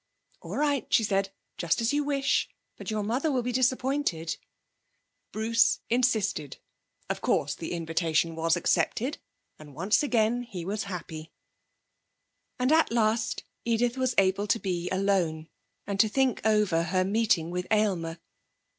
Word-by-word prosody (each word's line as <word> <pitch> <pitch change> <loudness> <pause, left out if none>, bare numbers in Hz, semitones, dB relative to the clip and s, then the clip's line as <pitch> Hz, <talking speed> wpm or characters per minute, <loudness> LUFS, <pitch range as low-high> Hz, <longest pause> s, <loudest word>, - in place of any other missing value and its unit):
'All - - -6
right,' 285 -3 0
she 225 - +4
said, 195 -2 0 0.3
'just 170 -2 +1
as 230 +3 +1
you 295 0 +1
wish. 275 -1 +1 0.3
But - - -8
your 215 -1 -1
mother 255 +9 0
will 255 -3 0
be 250 - -2
disappointed.' 255 - 0 1.0
Bruce 230 +2 +2
insisted. 220 - +1 0.5
Of - - -3
course 145 0 +1
the 160 +3 -6
invitation 165 -1 0
was 165 +1 +1
accepted, 250 - 0 0.4
and 150 -3 -13
once 190 +8 +2
again 240 -4 +1
he 190 -8 -7
was 205 +2 -2
happy! 165 -4 -7 1.3
And 255 +2 +1
at 320 -4 +4
last 220 -1 +1 0.2
Edith 235 +1 +1
was 255 -2 0
able 195 +1 +2
to 210 - +3
be 180 -4 -3
alone, 185 -5 0 0.4
and 200 -1 -4
to 220 - +5
think 265 +1 +1
over 210 -6 +3
her 185 +2 +1
meeting 195 -5 +1
with 180 0 -3
Aylmer. 185 -7 +1
210 Hz, 145 wpm, -28 LUFS, 170-245 Hz, 1.3 s, to